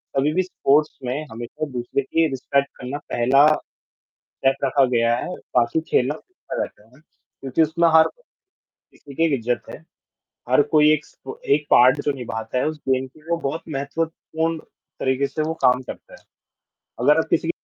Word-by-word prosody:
कभी 140 Hz, +3 st, +2 dB
भी 185 Hz, -, +2 dB
स्पोर्ट्स 150 Hz, -4 st, +1 dB
में 135 Hz, +5 st, -3 dB
हमेशा 120 Hz, +6 st, -5 dB
दूसरे 125 Hz, +2 st, -2 dB
की 160 Hz, +4 st, +1 dB
रिस्पेक्ट 140 Hz, +1 st, 0 dB
करना 130 Hz, +3 st, -5 dB
पहला 130 Hz, +4 st, +4 dB, 0.8 s
स्टेप 135 Hz, 0 st, -1 dB
रखा 135 Hz, 0 st, +3 dB
गया 115 Hz, 0 st, +3 dB
है, -, -, -4 dB, 0.3 s
बाकी 120 Hz, +5 st, +2 dB
खेलना 130 Hz, +4 st, +2 dB
तो -, -, -12 dB
होता -, -, -5 dB
रहता -, -, -6 dB
है -, -, -24 dB
वहाँ 130 Hz, +5 st, -22 dB, 0.4 s
क्योंकि 135 Hz, +4 st, 0 dB
उसमें 160 Hz, +2 st, +3 dB
हर 160 Hz, 0 st, +7 dB, 0.9 s
ठीक 140 Hz, +1 st, -14 dB
है, 165 Hz, -, +5 dB
इज्ज़त 120 Hz, 0 st, -2 dB
है। -, -, -8 dB, 0.7 s
हर 130 Hz, +3 st, +5 dB
कोई 150 Hz, -1 st, +6 dB
एक 155 Hz, 0 st, -2 dB
स -, -, -23 dB, 0.4 s
एक 150 Hz, 0 st, -4 dB
पार्ट 130 Hz, +4 st, +6 dB
जो 145 Hz, -, +2 dB
निभाता 115 Hz, -2 st, -5 dB
है 125 Hz, -, +1 dB
उस 155 Hz, 0 st, -3 dB
दिन 130 Hz, 0 st, +1 dB
के 130 Hz, -, -21 dB
लिए 155 Hz, +2 st, -17 dB
वो 170 Hz, -, +2 dB
बहुत 160 Hz, +4 st, -4 dB
महत्वपूर्ण 160 Hz, +3 st, -3 dB, 0.4 s
तरीके 130 Hz, +1 st, +1 dB
से 155 Hz, -, -4 dB
वो 155 Hz, +1 st, -1 dB
काम 125 Hz, 0 st, +4 dB
करता 130 Hz, -, -10 dB
है। -, -, -15 dB, 0.8 s
अगर 145 Hz, +5 st, +4 dB
आप -, -, -1 dB
किसी 165 Hz, -, +1 dB
140 Hz, 180 wpm, -22 LUFS, 125-155 Hz, 0.9 s, हर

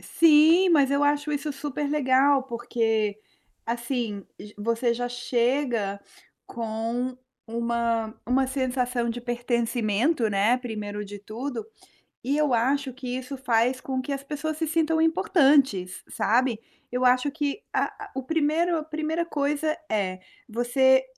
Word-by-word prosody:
Sim, 330 Hz, +3 st, +5 dB
mas 285 Hz, -5 st, +4 dB
eu 280 Hz, +1 st, +2 dB
acho 290 Hz, +1 st, +1 dB
isso 295 Hz, +1 st, -2 dB
super 285 Hz, +1 st, -3 dB
legal. 275 Hz, -1 st, +3 dB
Porque 225 Hz, -4 st, -1 dB, 0.5 s
assim, 235 Hz, -3 st, -3 dB, 0.3 s
você 230 Hz, +3 st, 0 dB
já 245 Hz, +1 st, -2 dB
chega 245 Hz, -4 st, 0 dB, 0.5 s
com 230 Hz, +2 st, -3 dB, 0.3 s
uma 230 Hz, -1 st, -1 dB
uma 260 Hz, +2 st, +2 dB
sensação 250 Hz, -2 st, -1 dB
de 245 Hz, -, -5 dB
pertencimento, 240 Hz, +1 st, 0 dB
né, 205 Hz, +4 st, +3 dB
primeiro 210 Hz, -4 st, -5 dB
de 205 Hz, 0 st, -8 dB
tudo, 230 Hz, +5 st, -5 dB, 0.6 s
e 275 Hz, +4 st, 0 dB
eu 300 Hz, -4 st, +2 dB
acho 265 Hz, +3 st, +1 dB
que 260 Hz, 0 st, -8 dB
isso 265 Hz, +2 st, -6 dB
faz 250 Hz, 0 st, +1 dB
com 260 Hz, -1 st, -2 dB
que 270 Hz, -, -6 dB
as 275 Hz, 0 st, -5 dB
pessoas 300 Hz, +2 st, -4 dB
se 320 Hz, -1 st, -1 dB
sintam 320 Hz, 0 st, +1 dB
importantes, 275 Hz, -, +3 dB
sabe. 235 Hz, 0 st, +1 dB, 0.3 s
Eu 250 Hz, +1 st, -1 dB
acho 250 Hz, +3 st, +3 dB
que 295 Hz, +7 st, -3 dB
a -, -, +2 dB, 0.2 s
a 400 Hz, -, -16 dB
o 265 Hz, -, -2 dB
primeiro 325 Hz, +4 st, +1 dB
a -, -, -5 dB
primeira 315 Hz, +2 st, -2 dB
coisa 295 Hz, 0 st, -1 dB
é 190 Hz, -3 st, -1 dB, 0.3 s
você 260 Hz, +3 st, +3 dB
255 Hz, 135 wpm, -26 LUFS, 230-290 Hz, 0.6 s, Sim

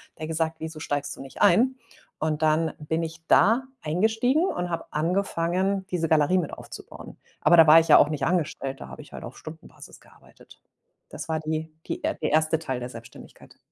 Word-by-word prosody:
er 155 Hz, -, -6 dB
gesagt: 160 Hz, 0 st, -1 dB
„Wieso 160 Hz, -1 st, -7 dB
steigst 145 Hz, -1 st, -3 dB
du -, -, -11 dB
nicht 135 Hz, -1 st, -10 dB
ein? 235 Hz, +8 st, +4 dB, 0.4 s
Und 155 Hz, 0 st, -1 dB
dann 155 Hz, +1 st, +2 dB
bin 160 Hz, +2 st, -2 dB
ich 165 Hz, 0 st, -7 dB
da 230 Hz, +5 st, +4 dB, 0.2 s
eingestiegen 225 Hz, -, +1 dB
und 180 Hz, -, -2 dB
habe 165 Hz, -1 st, -3 dB
angefangen, 185 Hz, +3 st, -1 dB
diese 170 Hz, -2 st, 0 dB
Galerie 160 Hz, +4 st, +3 dB
mit 165 Hz, -, -3 dB
aufzubauen. -, -, -11 dB, 0.2 s
Aber 175 Hz, -, +5 dB
da 165 Hz, -1 st, +8 dB
war 155 Hz, +2 st, +9 dB
ich 165 Hz, -, -1 dB
ja -, -, +9 dB
auch 145 Hz, -, +5 dB
nicht 150 Hz, -2 st, -2 dB
angestellt, 145 Hz, -6 st, -2 dB
da -, -, -8 dB
habe -, -, -10 dB
ich -, -, -19 dB
halt -, -, -8 dB
auf -, -, -9 dB
Stundenbasis -, -, -12 dB
gearbeitet. -, -, -20 dB, 0.5 s
Das -, -, -8 dB
war 160 Hz, 0 st, 0 dB
die 155 Hz, 0 st, -4 dB, 0.2 s
die, 340 Hz, -1 st, -5 dB
äh 315 Hz, -, 0 dB
der 155 Hz, -, -1 dB
erste 155 Hz, +1 st, +2 dB
Teil 130 Hz, -6 st, -4 dB
der 125 Hz, 0 st, -6 dB
Selbstständigkeit. 115 Hz, -1 st, -13 dB
160 Hz, 195 wpm, -25 LUFS, 155-180 Hz, 0.5 s, war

